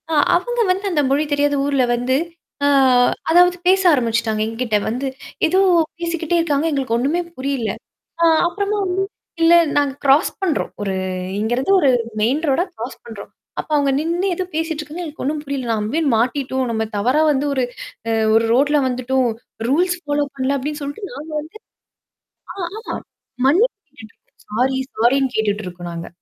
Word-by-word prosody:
ஆ, - - -2 0.2
அவங்க 485 +7 -1
வந்து 385 +3 -2
அந்த 305 -4 +2
மொழி 280 +3 +2
தெரியாத 290 0 +2
ஊர்ல 280 -2 +2
வந்து, 245 +2 0 0.5
ஆ, - - +4 0.6
அதாவது 355 +1 +5
பேச 380 +1 +5
ஆரம்பிச்சுட்டாங்க 230 -4 0
என்கிட்ட 225 -1 -1
வந்து. 250 +5 -2 0.4
ஏதோ 370 +4 +2 0.4
பேசிக்கிட்டே 335 0 -1
இருக்காங்க. 305 -2 +1
எங்களுக்கு 265 -5 0
ஒண்ணுமே 290 +8 0 0.2
புரியல. 260 -4 -2 0.5
ஆ, - - +4 0.2
அப்பறமா 405 +3 -2
வந்து, 375 +1 0 0.4
இல்ல, 330 +1 +6 0.2
நாங்க 285 -2 +2
கிராஸ் 280 +5 +4
பண்றோம். 355 -6 -1
ஒரு 195 -2 -2 0.4
இங்கருந்து 240 - 0
ஒரு 280 - +4 0.3
மெயின் 255 +8 +2
ரோடா 275 +6 +2
கிரராாஸ் 240 0 -7
பண்றோம். 220 -3 -10 0.3
அப்ப - - -6
அவங்க 285 -2 +2
நின்னு 340 +5 -1
ஏதோ 370 - -2
பேசிட்டு 320 -1 -2
இருக்காங்க 305 +4 -7
எனக்கு 310 -1 -7
ஒண்ணும் 295 +3 -1
புரியல. 275 -3 -4
நம்ம 215 -1 -1
போய், 325 +1 +1
மாட்டிட்டோம். 260 +2 0
நம்ம 220 -1 0
தவறா 255 +9 +2
வந்து 280 0 0
ஒரு 260 -2 0 0.5
அ - - +1 0.2
ஒரு 225 +1 +4
ரோட்ல 290 +4 +3
வந்துட்டோம் 255 0 0 0.4
ரூல்ஸ் 355 +6 +2
ஃபாலோ 290 0 0
பண்ணல 270 +1 0
அப்படின்னு 295 +3 -4
சொல்லிட்டு 285 +9 -5
நாங்க - - -8
வந்து 315 +1 -10 1.2
ஆ, - - -17 0.2
ஆமா. 445 - -5 0.5
மன்னபு 380 - +4 0.3
கேட்டுட்டு 220 -4 -12
இருக்கோம். - - -30
சாரி, 265 +1 +2 0.2
சாரின்னு 260 +3 +2
கேட்டுட்டு 210 -1 0
இருக்கோம் 175 -1 -7
நாங்க 170 0 -6
280 Hz, 160 wpm, -20 LUFS, 245-325 Hz, 1.2 s, இல்ல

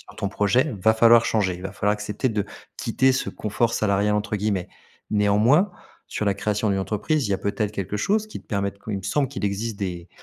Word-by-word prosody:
sur - - -16
ton 100 - -2
projet, 105 +6 +2
il 95 - -10
va 110 - +5
falloir 115 +1 +6
changer, 100 -5 +1
il 90 - -10
va 95 - -4
falloir 105 +1 +1
accepter 105 +4 -2
de 105 -2 -1 0.3
quitter 130 0 +2
ce 130 - -1
«confort 115 +2 -1
salarial» 105 0 +1
entre 105 +1 -2
guillemets. 100 -3 -1 0.4
Néanmoins, 110 - +3 0.4
sur 105 - -3
la 100 - +2
création 105 +1 -1
d'une 100 - +1
entreprise, 110 - -1
il - - -3
y - - +3
a - - -3
peut-être 100 +1 -1
quelque 100 0 -3
chose 210 - +1
qui 215 - -8
te - - -35
permette 100 -1 -2
il 105 - -1
me - - -10
semble, 140 +7 0
qu'il 130 -5 -5
existe 100 +2 -2
des 90 -3 -4
105 Hz, 230 wpm, -24 LUFS, 100-115 Hz, 0.4 s, falloir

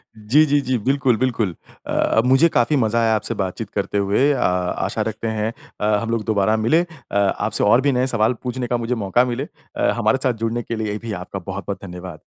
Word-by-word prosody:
जी, 115 +9 +3
जी, 145 -1 +2
जी, 130 -1 0
बिल्कुल, 130 +1 +1
बिल्कुल। 115 -8 0 0.3
अ, 110 - +2
मुझे 135 +6 +5
काफ़ी 120 +5 +3
मज़ा 115 -2 +1
आया 110 -1 +3
आपसे 110 +2 -2
बातचीत 95 +3 -4
करते 100 0 -1
हुए। 100 +9 +2
अ, 135 - -2
आशा 90 0 -1
रखते 110 +1 -4
हैं 110 +1 0 0.3
अ, 105 0 +2
हम 115 - -4
लोग 115 -2 -1
दोबारा 110 0 +2
मिलें, 115 +10 +3 0.3
अ, - - -5
आपसे 100 +1 +1
और 120 +5 +5
भी 140 +1 +2
नए 125 0 +1
सवाल 120 -1 +2
पूछने 125 0 -3
का 120 - 0
मुझे 120 +1 -2
मौका 120 +6 +3
मिले। 125 +4 -3 0.3
अ, - - +2
हमारे 110 +2 +2
साथ 130 - +2
जुड़ने 115 +1 -1
के 115 - -4
लिए 105 -1 -2
भी 115 0 -6
आपका 95 - -6
बहुत-बहुत 100 0 -5
धन्यवाद। 90 -2 -8
115 Hz, 215 wpm, -21 LUFS, 105-125 Hz, 0.3 s, मुझे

